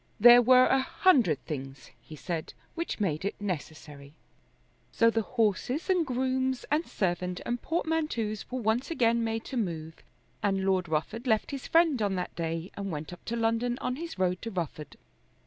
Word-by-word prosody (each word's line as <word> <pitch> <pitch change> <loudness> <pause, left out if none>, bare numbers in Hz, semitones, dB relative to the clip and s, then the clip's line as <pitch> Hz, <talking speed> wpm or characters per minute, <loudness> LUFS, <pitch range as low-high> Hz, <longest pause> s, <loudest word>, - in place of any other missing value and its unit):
There 240 +3 +9
were 255 +1 +6
a 265 - +3
hundred 250 - +2
things, 135 -3 -7
he 155 - -11
said, 160 +1 -5 0.2
which 335 -6 -4
made 165 -6 -1
it 200 - -3
necessary. 155 -6 -6 0.8
So 230 0 +4
the 225 - +1
horses 240 - 0
and 355 -4 +2
grooms 260 0 -1
and 310 +3 +1
servant 180 -1 -2
and 240 0 -2
portmanteaus 305 - -2
were 230 -3 +1
again 235 -7 +2
made 225 0 -2
to 265 - -5
move, 165 -7 -3 0.5
and 195 -1 0
Lord 185 -3 +1
Rufford 215 - -2
left 220 -2 +1
his 275 -2 -5
friend 325 -7 +3
on 200 -2 0
that 180 - -4
day 165 +1 -3
and 200 -1 -4
went 155 0 -5
up 175 - -13
to 235 - -3
London 230 +1 0
on 250 - -2
his 330 -4 -6
road 180 -1 0
to 230 - -4
Rufford. 165 -6 -5
220 Hz, 170 wpm, -29 LUFS, 175-255 Hz, 0.8 s, There